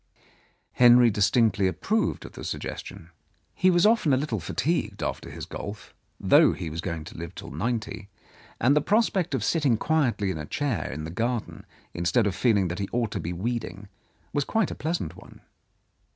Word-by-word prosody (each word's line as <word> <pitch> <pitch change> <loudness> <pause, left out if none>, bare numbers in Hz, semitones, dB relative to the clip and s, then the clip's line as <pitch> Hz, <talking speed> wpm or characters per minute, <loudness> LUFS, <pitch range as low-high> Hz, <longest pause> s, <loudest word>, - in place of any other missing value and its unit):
Henry 120 -1 +6
distinctly 105 -1 +3
approved 215 - -1
of - - -9
the - - -10
suggestion. 85 +1 -6 0.4
He 185 - +3
was 175 0 +4
often 210 -10 +4
a - - +4
little 130 -6 -2
fatigued 105 - -2
after - - -4
his - - -7
golf, 105 +1 -8 0.3
though - - +5
he 85 -4 -5
was 80 +1 -4
going 85 -4 -4
to 80 - -11
live 85 +1 -7
till - - -9
ninety, 110 - -3 0.5
and 135 +4 +4
the 150 - +4
prospect 195 -6 +1
of 120 - -2
sit 165 +8 +1
ting 130 -6 +3
quietly 125 -10 +1
in 80 - -5
a 75 - -6
chair 140 - -2
in 75 +3 -5
the 80 - -6
garden, 115 +4 -3 0.3
instead 90 +7 +1
of 100 - 0
feel 115 +2 +2
ing 95 -2 +1
that 85 - -4
he 100 - -3
ought 120 -3 -1
to 100 - -3
be 85 0 -4
weeding, 105 +1 -4 0.4
was 145 - +1
quite 220 +5 0
a - - -3
pleasant 155 - -3
one. - - -15
115 Hz, 190 wpm, -26 LUFS, 95-145 Hz, 0.5 s, Henry